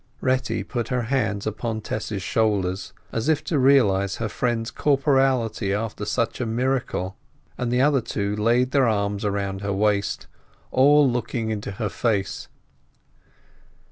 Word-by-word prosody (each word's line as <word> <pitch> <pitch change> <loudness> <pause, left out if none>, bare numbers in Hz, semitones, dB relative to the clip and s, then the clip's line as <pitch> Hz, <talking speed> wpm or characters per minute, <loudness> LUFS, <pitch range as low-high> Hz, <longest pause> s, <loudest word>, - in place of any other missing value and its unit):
Retty 130 0 0
put 120 -3 -3
her 125 -2 -1
hands 110 -5 -1
upon 110 +1 -3
Tess's 105 -2 -4
shoulders, 100 -4 0 0.2
as 115 +6 -1
if 155 -1 +2
to 150 -1 0
realize 100 -8 +4
her 115 -2 -3
friend's 120 0 -1
corporeality 135 -7 +1
after 105 -1 -3
such 115 +3 -1
a - - 0
miracle, 115 -5 -1 0.4
and 120 -1 -2
the 125 +1 +2
other 140 -2 +3
two 100 -2 -2
laid 120 +4 +2
their 135 -3 +3
arms 100 -2 0
round 100 -1 -2
her 100 0 -2
waist, 100 0 0 0.5
all 145 +2 +5
looking 120 -2 -2
into 105 -2 -4
her 105 +1 -2
face. 105 -5 -1
115 Hz, 140 wpm, -24 LUFS, 100-130 Hz, 0.5 s, all